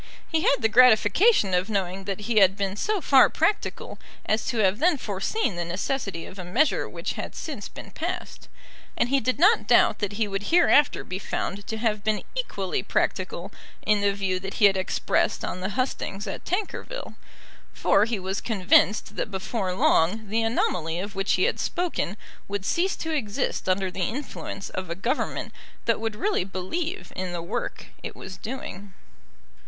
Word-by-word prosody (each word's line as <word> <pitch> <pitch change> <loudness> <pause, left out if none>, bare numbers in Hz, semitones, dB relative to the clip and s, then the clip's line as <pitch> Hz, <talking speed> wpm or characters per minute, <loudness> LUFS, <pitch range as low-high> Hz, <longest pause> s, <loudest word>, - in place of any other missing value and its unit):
He 320 -1 0
had 280 - +4
the - - +6
gratification 225 - +5
of 180 +3 +1
knowing 195 -2 -2
that 195 +1 -3
he 225 +1 -1
had 195 0 +5
been 195 -1 -1
so 410 - -1
far 270 -3 +6
practical 410 - -1 0.3
as 215 +1 0
to 240 - -1
have 200 0 +3
then 330 0 +3
foreseen 210 - -2
the 175 - -1
necessity 185 0 -3
of 190 - -11
a - - -4
measure 250 - +1
which - - -4
had - - -6
since - - -5
been - - -11
passed. - - -5 0.5
And 245 - +2
he 275 +1 +3
did 255 -1 0
not 405 +9 +4
doubt - - +5
that 205 -2 -2
he 215 +1 0
would 195 0 -3
hereafter 325 -4 +4
be 185 0 -5
found 200 0 -4
to 220 - -3
have 215 -2 0
been 215 -1 0
equally 200 - -2
practical 185 0 -1 0.3
in 210 -1 +3
the 200 0 +3
view 195 -2 -1
that 195 +1 -6
he 215 - +5
had 195 -1 +6
expressed 190 0 0
on 185 - -5
the 190 - -2
hustings 210 -3 -2
at 195 - -6
Tankerville, 430 +6 -3 0.6
for 200 +2 +3
he 230 -1 -1
was 190 +1 -3
convinced 205 -1 +3
that - - -2
before 195 0 -2
long 195 +5 +2
the 225 +2 +1
anomaly 175 -7 0
of 200 +2 -5
which 195 0 0
he - - +2
had 480 - +1
spoken 340 - -2 0.3
would 200 -1 -3
cease 365 - +1
to 320 -1 -4
exist 215 -8 -2
under 185 0 +1
the 185 - -5
influence 235 -5 -6
of 185 -2 -5
a 170 - -2
Government 230 +8 -2 0.3
that 230 - +2
would 225 -1 -3
really 405 - 0
believe 305 - -4
in 185 -1 -3
the 170 -1 -4
work 175 - -4 0.2
it - - -7
was 190 0 -8
doing. 205 -5 -7
205 Hz, 180 wpm, -25 LUFS, 190-255 Hz, 0.6 s, the